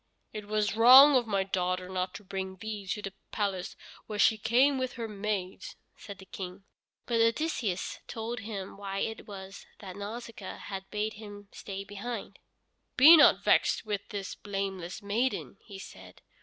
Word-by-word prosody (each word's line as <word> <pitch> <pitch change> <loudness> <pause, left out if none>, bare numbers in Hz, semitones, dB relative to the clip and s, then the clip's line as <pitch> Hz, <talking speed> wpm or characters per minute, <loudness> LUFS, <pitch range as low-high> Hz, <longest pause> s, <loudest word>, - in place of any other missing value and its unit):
"It 210 -1 -7
was 210 0 0
wrong 260 +5 +9
of 245 -3 +2
my 200 -2 +1
daughter 185 -1 -2
not 185 0 -3
to 210 - -9
bring 190 0 -5
thee 210 0 -6
to 210 +2 -3
the 195 - -5 0.2
palace 195 -4 -2 0.3
when 210 - -5
she 220 - +5
came 250 +6 +3
with 255 -1 -2
her 230 -1 -5
maids," 200 -3 -4 0.2
said 200 -2 -10
the 190 - -13
King. 185 0 -8 0.4
But 230 -2 +1
Odysseus 230 - 0
told 230 +1 -5
him 200 -3 -7
why 195 -1 -5
it 220 0 -4
was 195 -1 -10
that 190 -3 -9
Nausicaa 210 0 -7
had 190 -1 -7
bade 210 +1 -2
him 205 -1 -11
stay 195 -1 -7
behind. 205 +3 -7 0.6
"Be 300 +6 +10
not 305 - +6
vexed - - +3
with 205 -2 -2
this 200 -3 -5
blameless 195 -1 -5
maiden," 220 +1 -1
he 200 -3 -11
said. 195 - -12
205 Hz, 165 wpm, -29 LUFS, 195-225 Hz, 0.6 s, Be